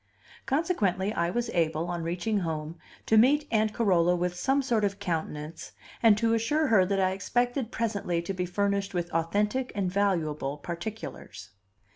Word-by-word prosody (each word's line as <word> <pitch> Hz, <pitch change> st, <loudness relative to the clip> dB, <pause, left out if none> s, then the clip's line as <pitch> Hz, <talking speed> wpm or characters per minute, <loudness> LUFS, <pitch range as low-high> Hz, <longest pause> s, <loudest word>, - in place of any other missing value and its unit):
Consequently, 215 Hz, -, 0 dB
I 170 Hz, -3 st, 0 dB
was 240 Hz, +5 st, -2 dB
able, 160 Hz, -1 st, 0 dB
on 175 Hz, -1 st, -3 dB
reaching 175 Hz, +6 st, -1 dB
home, 160 Hz, -2 st, -4 dB, 0.3 s
to 220 Hz, -, +5 dB
meet 290 Hz, +6 st, +4 dB
Aunt 215 Hz, -1 st, +2 dB
Carola 180 Hz, -6 st, +3 dB
with 175 Hz, 0 st, -1 dB
some 270 Hz, +10 st, +1 dB
sort 235 Hz, -5 st, +1 dB
of 200 Hz, -1 st, 0 dB
countenance, 160 Hz, -4 st, -4 dB, 0.3 s
and 220 Hz, -3 st, +6 dB
to 225 Hz, +1 st, +2 dB
assure 295 Hz, +7 st, +1 dB
her 190 Hz, -5 st, +5 dB
that 195 Hz, 0 st, 0 dB
I 185 Hz, -1 st, +2 dB
expected 245 Hz, +5 st, -1 dB
presently 205 Hz, -6 st, -1 dB
to 195 Hz, -, -3 dB
be 180 Hz, -1 st, -2 dB
furnished 200 Hz, +1 st, -1 dB
with 175 Hz, -1 st, -2 dB
authentic 210 Hz, +10 st, 0 dB
and 190 Hz, -3 st, -1 dB
valuable 160 Hz, -8 st, 0 dB
particulars. 170 Hz, -, -7 dB
195 Hz, 160 wpm, -28 LUFS, 170-225 Hz, 0.3 s, and